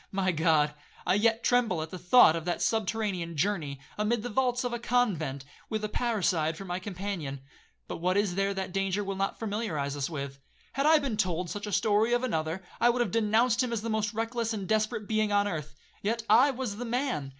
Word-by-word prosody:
my 190 -2 +1
God! 155 -2 +2 0.3
I 180 - +3
yet 225 +3 +2
tremble 240 -8 +2
at 160 - -9
the 185 - -6
thought 180 -1 +6
of 165 - -3
that 175 - -1
subterranean 200 -6 -1
journey, 155 -6 -1 0.2
amid 215 +1 +1
the 245 - -3
vaults 250 +1 +1
of 245 -1 -2
a 240 - -2
convent, 170 - 0 0.2
with 215 -1 -2
a 215 - -1
parricide 185 -10 0
for 195 - -8
my 180 0 -3
companion. 185 -7 -5 0.5
But - - -5
what 180 +3 +1
is 205 -3 +1
there 195 +2 0
that 190 -1 -4
danger 195 +1 0
will 195 0 -3
not 195 +1 -2
familiarize 200 -11 -2
us 140 +1 -2
with? 140 -3 -5 0.3
Had 275 +2 +1
I 315 0 +7
been 275 -7 -2
told 180 -3 -1
such 205 0 -5
a - - -4
story 215 +4 +2
of 245 +1 +1
another, 165 -5 -2 0.2
I 240 - +5
would 245 0 +1
have 240 - 0
denounced 230 +2 +3
him 250 -2 -1
as 225 -2 -2
the 230 - -2
most 215 -1 0
reckless 230 0 -1
and 200 -3 -4
desperate 215 -1 0
being 215 -1 +1
on 205 0 +3
earth—yet 175 +7 -5
I 265 +4 +6
was 250 -6 -3
the 245 - -4
man. 245 - -1
205 Hz, 215 wpm, -29 LUFS, 175-230 Hz, 0.5 s, I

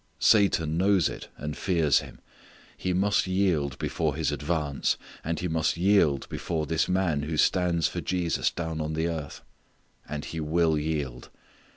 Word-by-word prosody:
Satan 85 -7 +3
knows 95 -3 +3
it, - - -8
and 75 +2 -5
fears 80 -8 +2
Him. - - -11 0.5
He 95 - -2
must 95 +2 +2
yield 90 -8 +1
before 80 -4 -1
His 80 -1 0
advance, 75 -1 -1 0.3
and 80 0 -2
he 90 - -2
must 80 0 0
yield 90 -7 +3
before 80 -2 -3
this 80 +2 0
man 90 -5 +1
who 75 +2 -3
stands 85 0 +2
for - - -4
Jesus 90 -2 0
down 80 -2 -4
on 75 0 -3
the 80 +1 0
earth. 80 -4 -5 0.7
And 75 -1 -4
he 80 - -5
will 80 +1 +2
yield. 75 -5 -3
80 Hz, 160 wpm, -27 LUFS, 75-90 Hz, 0.7 s, Satan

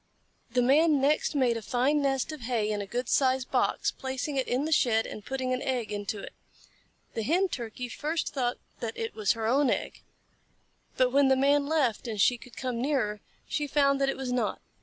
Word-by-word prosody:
The 245 +1 +1
Man 295 +3 +4
next 295 +3 +1
made 250 -4 +2
a - - -5
fine 270 +6 +1
nest 270 +1 0
of 305 -3 -8
hay 225 -3 -1
in 205 -1 -1
a 200 - -6
good 245 +4 -3
sized 260 -1 +2
box, - - +1
placing 265 +2 -4
it 265 -1 0
in 255 +4 0
the 315 - -3
shed 230 -7 +3
and 210 - -8
putting 260 0 -2
an 255 - -2
egg 250 -4 -2
into 205 0 -3
it. - - -9 0.8
The 225 - -2
Hen 355 - +2
Turkey 245 -2 -5
first 310 +6 -3
thought 250 -3 -1 0.2
that 230 -2 -4
it 225 - -3
was 215 -2 +1
her 225 -1 -4
own 265 +4 +3
egg, - - -2 1.0
but 255 -1 +3
when 280 +1 +4
the 265 - +5
Man 280 +1 +3
left 275 -8 +1
and 220 -3 -4
she 245 +4 +4
could 240 -2 -15
come 250 -3 -3
nearer, 240 -7 0 0.3
she 295 -1 -2
found 280 -1 +2
that 275 - +3
it - - -2
was 265 -2 -3
not. 250 -1 -1
255 Hz, 210 wpm, -28 LUFS, 230-280 Hz, 1.0 s, the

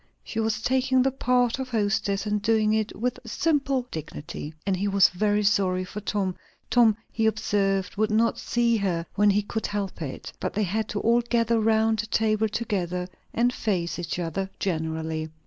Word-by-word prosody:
She 225 - -4
was 220 0 -1
taking 260 0 +3
the 270 - +2
part 250 -1 +1
of 260 -1 -4
hostess, 205 -3 0
and 210 0 0
doing 215 0 +2
it 220 0 -1
with 250 +2 -1
simple 275 0 0
dignity; 155 0 -6
and 195 -1 +1
he 195 +3 -1
was 200 -1 +5
very 210 +3 +1
sorry 190 -3 +2
for 200 +3 -7
Tom. 195 -2 -1 0.4
Tom, 230 -4 +5
he 225 -1 +1
observed, 195 -3 0
would 215 +1 +2
not 225 +2 +2
see 235 -1 +1
her 180 -5 -1
when 205 +1 +4
he 205 +1 +2
could 220 +2 -3
help 200 -4 -4
it. 140 -4 -6
But - - -3
they 210 - +1
had 215 +3 -1
to 205 - -2
all 235 +1 +4
gather 235 -1 +1
round 220 0 +2
the 215 - -2
table 220 0 +1
together 180 -5 -2 0.2
and 245 +2 +2
face 180 -8 -1
each 170 -1 -3
other 180 +3 -2
generally. 160 -2 -2
210 Hz, 180 wpm, -26 LUFS, 190-230 Hz, 0.4 s, was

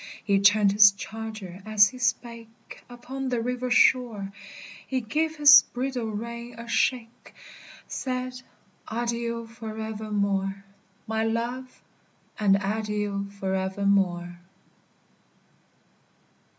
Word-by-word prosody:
He 200 -1 +2
turned 200 0 +5
his 205 0 +7
charger 210 -2 -8
as 210 -1 +5
he 255 - -12
spake, 230 -1 -4
Upon 260 +2 -6
the 245 -2 -1
river 250 +2 -3
shore; 240 -5 +3 0.6
He 260 - -1
gave 310 +7 -1
his 295 -1 +9
bridle 250 -1 -4
rein 235 +2 -6
a 235 0 -9
shake, 235 0 -2 0.5
Said, 255 -1 -4 0.5
"Adieu 235 0 -3
for 225 -1 -9
evermore, 200 -3 -2 0.4
My 220 0 -1
love! 240 +3 -3 0.6
And 200 -2 +4
adieu 205 -1 -2
for 190 -1 -2
evermore." 190 -2 0
220 Hz, 100 wpm, -26 LUFS, 200-245 Hz, 0.6 s, his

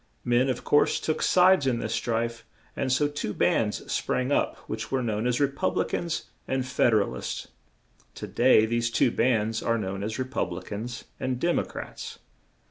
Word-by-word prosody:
Men, 120 +2 +3
of 125 -2 -2
course, 145 - +3
took 155 - -2
sides 185 -5 +5
in 125 -2 +2
this 110 -1 -3
strife, 115 0 -1 0.3
and 135 -2 -1
so 145 +3 +3
two 145 -8 -4
bands 105 -2 0
sprang 130 +2 0
up - - +1
which 110 +1 -5
were 135 -1 0
known 110 0 -1
as 125 +1 +1
Re 145 - +5
pub 140 +7 -2
li - - +2
cans 170 -2 -2 0.2
and 130 -1 -1
Fed 120 -3 +2
er 105 - +5
al - - -6
ists; - - -5 0.7
to - - -6
day 120 -3 +4
these 115 +1 0
two 120 +1 +2
bands 115 -2 +1
are 115 0 +1
known 95 -2 -3
as 110 +2 -3
Re 130 - -1
pub 130 -9 -2
li 85 - -6
cans 115 +4 -6 0.2
and 130 -1 -2
Dem 175 +5 +2
o - - 0
crats. - - -8
120 Hz, 205 wpm, -27 LUFS, 110-130 Hz, 0.7 s, sides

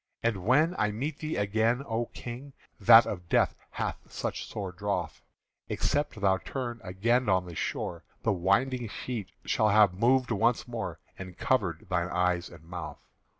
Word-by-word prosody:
"And 110 -6 0
when 150 - +3
I 105 - +2
meet 135 +8 -4
thee 155 0 -3
again, 110 +5 +1
O 115 -1 -1
King, 125 +4 -8 0.3
That 115 +2 +9
of 90 -3 -5
death - - +3 0.2
hast - - -4
such - - -4
sore 100 -3 -5
drouth, 90 -2 -3 0.5
Except 145 -6 -1
thou 95 -1 +3
turn 120 +3 -5
again 110 +6 +1
on 95 -1 +3
this 85 -3 -6
shore, 85 0 -3 0.2
The 110 - +2
winding 115 +7 +1
sheet 110 -4 -5 0.2
shall 110 - +2
have 105 -2 +5
moved 125 +6 +2
once 115 +3 +2
more 120 -2 -4 0.2
And 95 -2 -8
covered 100 -7 0
thine 90 -1 0
eyes 90 -1 0
and 85 -2 -14
mouth. 80 -3 -8
105 Hz, 160 wpm, -29 LUFS, 90-120 Hz, 0.5 s, That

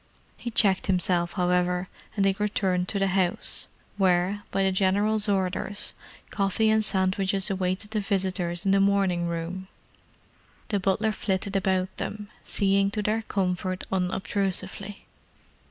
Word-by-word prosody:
He 240 - -5
checked 200 -4 +3
himself, 180 -2 +1
however, 180 0 +1 0.3
and 200 -2 +2
they 195 - +5
returned 190 -3 0
to 200 - -1
the 195 - +2
house, 185 -2 0 0.3
where, 190 +1 +2
by 195 - +1
the 190 - +3
General's 205 +3 +2
orders, 195 +1 -1 0.4
coffee 210 +2 +2
and 220 0 +3
sandwiches 195 0 +1
awaited 190 +2 -2
the 220 - +1
visitors 190 -3 -1
in 195 - +3
the 195 - +4
morning 195 -3 +2
room. 170 +3 -4 1.0
The 205 -3 +1
butler 195 +4 +1
flitted 200 -1 -2
about 190 -1 0
them, 210 -1 -5
seeing 195 0 +2
to 210 +1 -2
their 215 +2 +1
comfort 185 -3 -2
unobtrusively. 190 +1 -2
195 Hz, 135 wpm, -26 LUFS, 185-200 Hz, 1.0 s, they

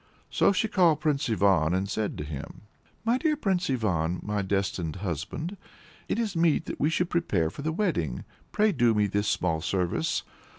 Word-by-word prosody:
So - - +4
she 200 +3 +1
called 175 -7 +3
Prince 150 -3 0
Ivan 95 -6 +3
and 95 +1 0
said 105 +1 -2
to - - -4
him 75 0 -7 0.4
"My 235 +3 +2
dear 305 -1 +1
Prince 190 - 0
Ivan, 90 -9 0
my 105 0 -1
destined 95 -4 -1
husband! 100 - -4 0.5
It - - -1
is 220 -5 -1
meet 165 -2 +2
that - - -6
we 150 - +2
should 175 +2 0
prepare 100 - +1
for - - -8
the 160 +2 -1
wedding; 145 - -1 0.3
pray 215 0 +3
do 120 - +3
me 105 0 +3
this 100 +1 -1
small 80 -6 0
service. 90 0 -1
110 Hz, 180 wpm, -27 LUFS, -, 0.5 s, So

